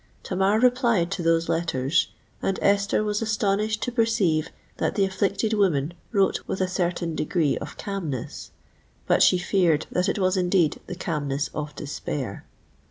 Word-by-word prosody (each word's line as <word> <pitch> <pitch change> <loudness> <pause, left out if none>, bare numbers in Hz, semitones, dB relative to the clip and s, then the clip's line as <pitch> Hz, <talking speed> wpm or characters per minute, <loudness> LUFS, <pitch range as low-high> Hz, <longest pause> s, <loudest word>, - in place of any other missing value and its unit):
Tamar 195 +3 +1
replied 235 -7 +3
to 195 - -2
those 165 0 +2
letters; 160 -4 +1 0.3
and 195 - 0
Esther 200 +1 +2
was 210 0 -1
astonished 215 0 0
to 245 - -2
perceive 205 -10 +1 0.3
that - - -1
the 200 - +3
afflicted 195 +3 0
woman 170 -7 +1 0.2
wrote 200 -4 +2
with - - -3
a 185 - +1
certain 175 -2 -1
degree 155 -1 0
of - - -8
calmness:—but 175 - -4
she 185 - +6
feared 175 -4 +2
that 180 +2 +1
it - - -1
was 185 -1 +1
indeed 180 -3 +2
the 180 - -5
calmness 145 -5 -2
of 150 -1 -5
despair! 140 -6 -5
185 Hz, 150 wpm, -25 LUFS, 160-200 Hz, 0.3 s, she